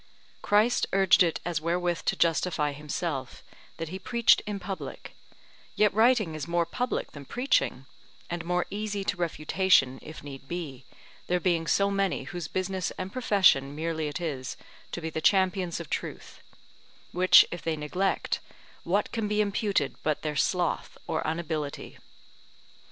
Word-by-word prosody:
Christ 215 +4 +3
urged 195 -1 +5
it 170 -3 +3
as 170 -3 -1
wherewith 175 +1 0
to - - +2
justify 165 -2 +1
himself, 145 -2 -4 0.3
that 165 -1 -4
he 190 +3 -6
preached 235 +4 +4
in 205 -1 -3
public; 190 +1 -7 0.6
yet 210 -2 +3
writing 220 -5 +3
is 155 +1 -5
more 170 0 +1
public 245 +9 -2
than 145 - -10
preaching; 240 - 0 0.4
and 170 -1 -4
more 180 +1 0
easy 205 0 -3
to 200 - -1
refutation, 165 -5 +2
if 155 -1 -10
need 135 -1 -9
be, 150 -7 -6 0.4
there 180 0 +1
being 170 -3 +1
so 200 +3 +3
many 195 -6 0
whose 150 +4 -5
business 185 +1 -2
and 185 +1 -5
profession 190 - +3
merely 160 0 -2
it 150 - -4
is 140 -7 -4 0.3
to 175 - -4
be 160 0 -4
the 160 - -3
champions 185 -2 +2
of 170 - -7
truth; - - -5 0.7
which 185 +1 +7
if 175 - -5
they 160 -1 -2
neglect, 180 +6 -1 0.4
what 200 +4 0
can 225 -2 -1
be 210 0 0
imputed 200 -7 +1
but 155 -1 -1
their 150 -1 -2
sloth, 175 +3 0
or - - -1
unability? 160 -3 -4
175 Hz, 150 wpm, -28 LUFS, 155-195 Hz, 0.7 s, which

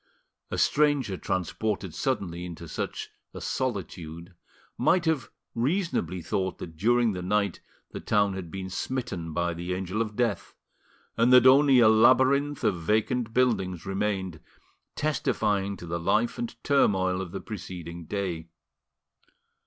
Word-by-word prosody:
A - - -3
stranger 145 -9 +2
transported 95 +1 -2
suddenly 90 -10 -2
into 85 -1 -8
such - - -5 0.2
a - - -5
solitude 90 -8 -4 0.4
might 180 -1 +2
have 160 -7 0 0.2
reasonably 120 - -1
thought 95 +2 -2
that 80 -2 -8
during 120 +6 +3
the 90 - -4
night 100 0 0 0.3
the - - -6
town 100 -2 +1
had 95 -3 -6
been 95 +2 -5
smitten 115 -8 -3
by 85 +2 -1
the 85 +2 -3
Angel 95 +3 -2
of 105 -2 -3
Death, 115 -6 -1 0.6
and 115 +2 +4
that 125 -1 +8
only 135 +1 +7
a 115 - +7
labyrinth 130 +6 +4
of 90 -5 +1
vacant 110 +6 0
buildings 100 -9 +1
remained, 95 -3 -2 0.6
testifying 105 -9 0
to 85 - -9
the 85 0 -3
life 110 - +1
and 240 -1 -4
turmoil 95 -9 +2
of 90 -3 -6
the - - -4
preceding 85 -5 -7
day. 90 -4 -3
100 Hz, 135 wpm, -27 LUFS, 90-125 Hz, 0.6 s, that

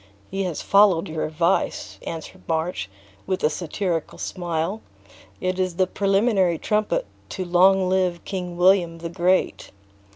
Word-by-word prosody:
"He 195 0 -1
has 175 -4 -4
followed 195 -4 +4
your 160 0 -3
advice," 165 +4 -1
answered 165 +3 -7
March, 160 - -2 0.4
with 185 -1 -2
a 150 - +3
satirical 170 +1 -3
smile, 175 +3 -3 0.6
"it 185 +5 -2
is 185 -2 0
the 185 +1 +3
preliminary 195 -2 +2
trumpet 215 - 0 0.2
to 185 - -4
long 185 +2 +4
live 185 -2 0
King 180 -3 -5
William 180 -2 +4
the 170 0 -6
Great!" 180 +2 0
180 Hz, 135 wpm, -23 LUFS, 170-190 Hz, 0.6 s, followed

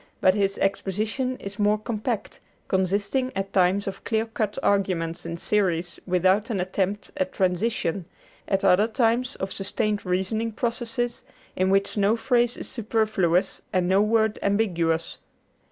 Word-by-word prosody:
But 185 - +5
his 195 -1 0
exposition 215 +7 -1
is 200 +1 -8
more 210 +1 +3
compact, 215 +1 -3 0.3
consisting 200 +8 0
at 195 0 -3
times 190 +2 +3
of 195 0 -6
clear 220 0 0
cut 225 -2 -3
arguments 175 -5 0
in 170 0 -4
series 175 -3 0
without 185 +4 +2
an 210 -5 -1
attempt 190 +2 -2
at 280 -1 -1
transition, 185 -2 0 0.4
at 195 0 +1
other 195 +3 +5
times 240 +2 +1
of 190 0 -4
sustained 205 +1 -1
reasoning 195 +5 -1
processes 240 +1 -2 0.3
in 185 +1 +1
which 195 +2 +1
no 205 +2 +3
phrase 240 +1 +1
is - - -7
superfluous 215 -6 0
and 180 -1 +1
no 190 +2 +4
word 220 0 +2
ambiguous. 170 -6 0
200 Hz, 140 wpm, -25 LUFS, 185-225 Hz, 0.4 s, But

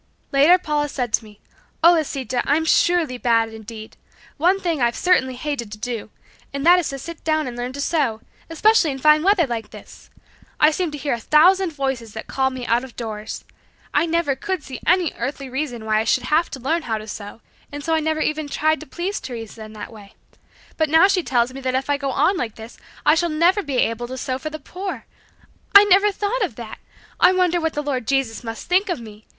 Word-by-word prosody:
Later 290 +6 +6
Paula 300 -4 -1
said 245 -5 -3
to - - +2
me, 210 -1 -16 0.4
"Oh, 340 - +9
Lisita, 270 -6 -1
I'm 310 +3 +2
surely 320 -7 +2
bad 230 -2 +2
indeed. 220 0 -10 0.4
One 360 +6 +3
thing 335 -7 -2
I've 235 -1 +2
certainly 260 -8 +2
hated 250 -5 -4
to - - -8
do, 230 -1 -5 0.4
and 280 +1 -4
that 355 +1 +7
is 345 - -2
to 275 - -5
sit 335 +5 -9
down 310 -1 +1
and 245 -2 -6
learn 245 +1 -4
to 280 - -5
sew, 275 -8 0 0.3
especially 355 +1 +3
in 270 - -3
fine 305 +3 +5
weather 380 -1 +3
like 230 -4 -5
this. - - -14 0.5
I 305 +1 +6
seem 350 +2 -1
to 295 - -7
hear 285 0 -2
a 235 - -3
thousand 360 +8 +4
voices 265 -6 -3
that 220 - -7
call 265 0 0
me 260 -2 -6
out 240 +2 +1
of 260 -2 -11
doors. 220 -2 -6 0.5
I 335 - +2
never 330 -4 +1
could 375 -2 -3
see 265 - -8
any 360 -1 +3
earthly 270 +2 -4
reason 255 -5 -4
why 215 0 +2
I - - +1
should 250 - +2
have 315 +6 +1
to 270 - -7
learn 315 +7 0
how 225 -7 -2
to 215 0 -9
sew, 210 +1 -8 0.3
and 290 0 -7
so 325 - 0
I 320 - +3
never 315 0 -1
even 305 -1 -1
tried 310 +2 +1
to 310 - -11
please 365 +7 -3
Teresa 225 -3 -8
in 215 - -12
that 215 +1 -9
way. 205 -2 -14 0.6
But 315 -1 +1
now 320 +5 +6
she 390 -2 +2
tells 245 -4 0
me 270 - -8
that 255 -1 -1
if 270 +2 -1
I 285 - +2
go 280 -1 -3
on 310 +9 +2
like 230 -8 -3
this 225 +1 -11 0.3
I - - +6
shall 340 +2 +1
never 340 +6 +3
be 285 -7 -3
able 240 0 0
to 260 +1 -7
sew 260 0 -3
for 310 - -5
the 310 - -6
poor. 370 +6 -7 0.7
I 400 - +11
never 410 +1 +4
thought 415 +5 -2
of 330 - -3
that! 230 -2 -9 0.4
I 370 - +6
wonder 355 -2 +2
what 320 0 -1
the 295 - -3
Lord 260 -5 -3
Jesus 270 -5 0
must 225 -1 -6
think 380 +3 +2
of 350 - -1
me. 215 -2 -13
280 Hz, 230 wpm, -21 LUFS, 240-330 Hz, 0.7 s, I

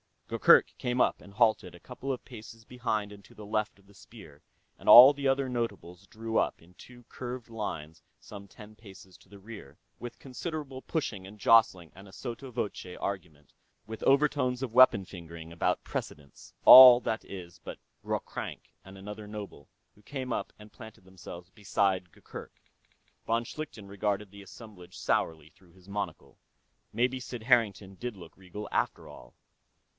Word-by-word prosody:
Gurgurk - - +5
came 125 +1 -2
up - - +1
and 100 - -15
halted 110 -5 +1
a - - -14
couple 130 +5 -6
of 130 - -5
paces 115 -2 -12
behind 110 -4 -3
and 100 -1 -13
to - - -19
the 105 - -11
left 105 0 -2
of 100 - -25
the 100 - -21
spear, 100 -8 -15 0.4
and - - -14
all 130 +4 +11
the 140 -1 -3
other 135 0 +1
nobles 100 -6 -5
drew 115 0 -4
up - - 0
in 85 +2 -20
two 120 -1 -15
curved 125 -1 -7
lines 85 -8 -6 0.2
some 100 -1 -12
ten 105 +2 -14
paces 95 -4 -15
to - - -23
the 100 - -13
rear, 100 -9 -12 0.2
with 120 0 -8
considerable 140 0 -7
pushing 105 - -4
and 105 +2 -13
jostling 100 -7 +3
and 95 +1 -14
a 95 - -16
sotto 125 +4 -7
voce 105 -6 -5
argument, 85 -8 -6 0.3
with 110 0 -8
overtones 135 -2 +2
of 120 -4 -5
weapon 125 -5 +6
fingering, 85 -3 -11
about 85 - -1
precedence. 70 -2 -8
All, 125 -1 +11
that 110 -2 -3
is, 85 -3 -10
but - - -9 0.3
Ghroghrank - - -5
and 95 0 -12
another 105 +2 -9
noble, 105 -9 -9 0.3
who 105 - -23
came 130 +2 -6
up - - -4
and 105 0 -15
planted 110 -5 -13
themselves 90 -1 -12
beside 95 -3 -1
Gurgurk. - - -11 0.7
Von 115 +1 +1
Schlichten 115 -6 -8
regarded 100 0 -3
the 100 0 -12
assemblage 100 -3 -13
sourly 80 -1 -1
through 95 -2 -24
his 95 +1 -20
monocle. 90 -9 -6 0.5
Maybe 125 +4 0
Sid 120 -2 -8
Harrington 105 -5 +1
did 120 +3 -6
look 85 -4 -13
regal, 95 +2 -9
after - - -2
all. - - -14
105 Hz, 170 wpm, -29 LUFS, 95-120 Hz, 0.7 s, all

